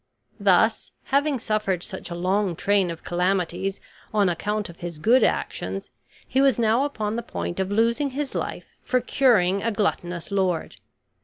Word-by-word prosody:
Thus, - - +3
having 280 +1 +1
suffered 210 -6 -1
such - - -7
a 170 - -5
long 185 +1 0
train 195 0 +2
of 165 -1 -7
calamities 180 +1 -1 0.3
on 205 -3 +3
account 210 +5 -2
of 170 - -12
his 170 -2 -6
good 230 +9 +4
actions, 95 +2 -2 0.4
he 265 - +2
was 275 -2 +4
now 230 +3 +3
upon 220 -6 -2
the - - -1
point 190 -5 -5
of 190 +1 -1
losing 235 +7 +2
his 275 +1 -4
life - - -4 0.2
for 255 - +1
curing 215 -7 +3
a 230 - 0
gluttonous 180 -4 -2
lord. 185 -4 0
205 Hz, 160 wpm, -24 LUFS, 180-235 Hz, 0.4 s, good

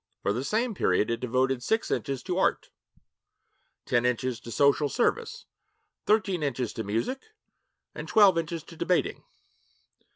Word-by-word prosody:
For 100 - +1
the 120 +4 -2
same 225 - 0
period, 105 - +1
it 115 - -1
devoted 130 +1 0
six 220 - 0
inches 135 -3 -2
to 185 0 -2
art, - - 0 1.1
ten 120 - +1
inches 125 0 -1
to - - -11
social 140 +3 +3
service, 450 - -1 0.6
thirteen 195 -5 +2
inches 130 -5 -2
to 115 - -4
music, 115 - -2 0.7
and - - -7
twelve 205 -4 +6
inches 165 -1 -3
to 165 - -13
debating. 180 +2 0
140 Hz, 140 wpm, -27 LUFS, 125-190 Hz, 1.1 s, twelve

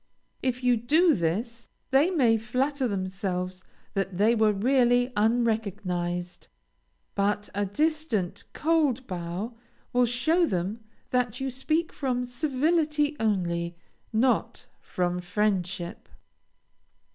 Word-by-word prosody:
If 255 -1 -1
you 245 -1 +4
do 315 +9 +4
this, 225 +8 -2 0.2
they 275 +6 +5
may 260 -11 +3
flatter 255 +5 0
themselves 185 -2 -3 0.3
that 195 -2 -2
they 215 +4 +4
were 220 -2 +4
really 245 +3 +3
unrecognized, 205 -6 -1 0.7
but 205 +1 0
a 205 0 -1
distant, 300 - -1
cold 300 -6 +1
bow 180 +5 -4 0.4
will 245 0 +4
show 315 +9 +2
them 190 +4 -2 0.3
that 250 -2 0
you 265 0 -2
speak 310 +6 -1
from 250 -3 -1
civility 295 +3 +1
only, 175 -5 0 0.4
not 245 +3 +1 0.2
from 180 0 -1
friendship. 180 -2 -2
225 Hz, 105 wpm, -27 LUFS, 190-265 Hz, 0.7 s, they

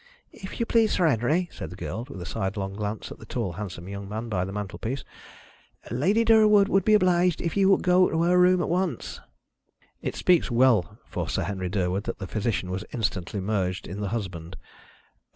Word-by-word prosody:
"If 190 -3 -9
you 235 - +1
please, 225 -2 +3
Sir 180 - +2
Henry," 150 +7 +1
said - - -7
the 90 - -9
girl, 110 +5 -5
with 95 - -8
a 90 - -6
sidelong 95 +1 -3
glance 105 +1 -4
at - - -9
the - - -11
tall 115 -7 -2
handsome 90 -1 -7
young 100 0 -7
man 110 +3 -5
by 90 -4 0
the 95 - -6
mantelpiece, 105 +6 -4 0.9
"Lady 195 - +2
Durwood 215 -3 +6
would 195 -2 +3
be 215 +2 +5
obliged 180 -3 +3
if 170 - -3
you 195 -1 +4
would 195 - +4
go 180 0 +4
to 160 +1 0
her 180 +1 +4
room 180 0 +5
at - - -1
once." 175 -6 -2 0.8
It - - -3
speaks 175 -4 +3
well 120 -6 +3
for - - -4
Sir - - -1
Henry 95 -2 -3
Durwood 95 +2 -1
that - - -4
the 95 - -6
physician 105 -2 -2
was 95 +2 -3
instantly 100 -4 -2
merged 95 -2 -1
in 95 +4 -6
the 100 - -2
husband. 95 -6 -5
115 Hz, 200 wpm, -26 LUFS, -, 0.9 s, Durwood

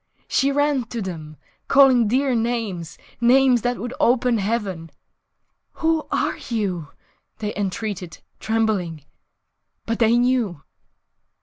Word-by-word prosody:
She 275 +1 +2
ran 285 -3 +1
to 235 0 -6
them, 160 -6 -6 0.3
Calling 260 -5 +5
dear 260 +4 +1
names, 225 -9 -2 0.2
(Names 250 0 +5
that 245 +1 -1
would 245 +1 -5
open 245 -1 +3
heaven) 195 -6 -2 0.8
"Who 320 -1 0
are - - -1
you?" 195 -9 -2 0.5
they 210 -1 -4
entreated, 195 -3 -4 0.2
trembling.... 200 -9 -1 0.8
But 230 0 -2
they 230 0 +4
knew! 240 - 0
225 Hz, 110 wpm, -22 LUFS, 190-250 Hz, 0.8 s, Calling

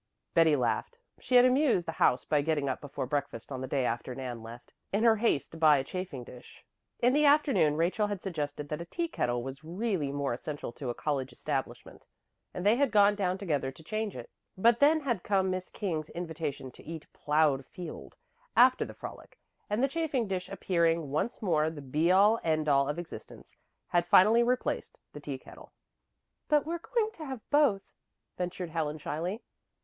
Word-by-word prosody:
Betty 160 -2 +5
laughed. 130 - -1 0.2
She 255 - -1
had 245 0 +8
amused 255 - +3
the - - -1
house 130 -5 +2
by 150 -1 +2
getting 145 -2 0
up 130 - -2
before 140 -2 -4
breakfast 140 -3 -3
on 130 -1 -4
the 130 - -4
day 135 -1 0
after 120 +2 -3
Nan 125 -3 -5
left, 115 +2 -11 0.2
in 205 +3 +1
her 225 -2 +5
haste 210 - 0
to 165 - -10
buy 155 -2 +6
a 135 - -1
chafing 180 -5 -5
dish. 120 +1 -14 0.4
In 245 +1 +4
the 300 +1 +4
afternoon 285 - +4
Rachel 185 +6 +1
had 205 -2 -3
suggested 150 -5 -4
that 150 +2 -3
a - - -6
teakettle 170 - -2
was 135 +3 -7
really 175 -3 -2
more 140 -2 -1
essential 145 +1 -5
to 130 +1 -6
a 120 - -3
college 140 -4 -2
establishment, - - -5 0.4
and 180 - -6
they 215 +3 +5
had 280 -1 +3
gone 205 -2 +5
down 190 -3 -1
together 150 -9 -1
to 145 +4 -16
change 215 +4 -3
it. 120 -2 -9 0.3
But 235 +4 +4
then 310 +2 +5
had 240 -9 -1
come 190 -1 +1
Miss 185 0 -4
King's 165 -7 -3
invitation 160 -6 -5
to - - -16
eat 160 -1 -7
"plowed 150 -2 +2
field" 170 +4 -9 0.4
after 255 +1 +6
the - - -9
frolic; - - -10 0.3
and 210 +5 0
the - - +5
chafing 280 -6 -1
dish, 185 -2 -3
appearing 170 -5 0
once 155 +11 -2
more 160 -5 +2
the 160 -2 -8
be 150 +5 +1
all 205 +4 +5
and 160 -6 0
end 155 - -2
all 140 0 +3
of 145 - -2
existence, 175 -1 -9 0.3
had 175 0 +1
finally 215 +6 +6
replaced 250 +1 -1 0.2
the - - -8
teakettle. - - -9 0.7
"But 300 -2 +3
we're 335 +2 -3
going 440 +4 -1
to 325 -7 -9
have 265 -4 -7
both," 280 -10 +4 0.5
ventured 180 -1 -4
Helen 155 -2 -2
shyly. 170 +9 -4
170 Hz, 190 wpm, -30 LUFS, 145-220 Hz, 0.7 s, had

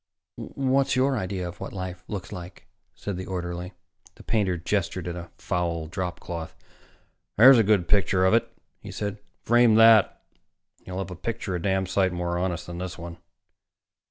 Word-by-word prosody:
"What's 135 0 0
your 135 +1 +2
idea 95 -4 -3
of 85 0 -9
what - - -7
life 90 -1 -6
looks 100 -4 -6
like?" 90 -3 -9 0.3
said 100 -3 -5
the 95 - -6
orderly. 90 0 -4 0.4
The - - -15
painter 95 -5 0
gestured 90 0 -2
at 85 - -4
a 85 -1 -8
foul 85 -3 -2
dropcloth. 90 -2 -5 0.8
"There's 125 +3 +9
a - - +5
good 100 -4 +2
picture 95 -1 +3
of 95 - +4
it," 115 - +2 0.3
he - - -10
said. 105 0 -4 0.2
"Frame 120 -1 +5
that, 115 -2 +6 0.6
and - - -31
you'll 90 0 -5
have 95 -1 -4
a - - -6
picture 100 +1 -4
a 90 - -2
damn 95 0 +1
sight 95 0 +1
more 85 0 -2
honest 90 -2 -2
than 85 0 -7
this 90 0 -5
one." 85 0 -8
95 Hz, 175 wpm, -26 LUFS, 90-105 Hz, 0.8 s, There's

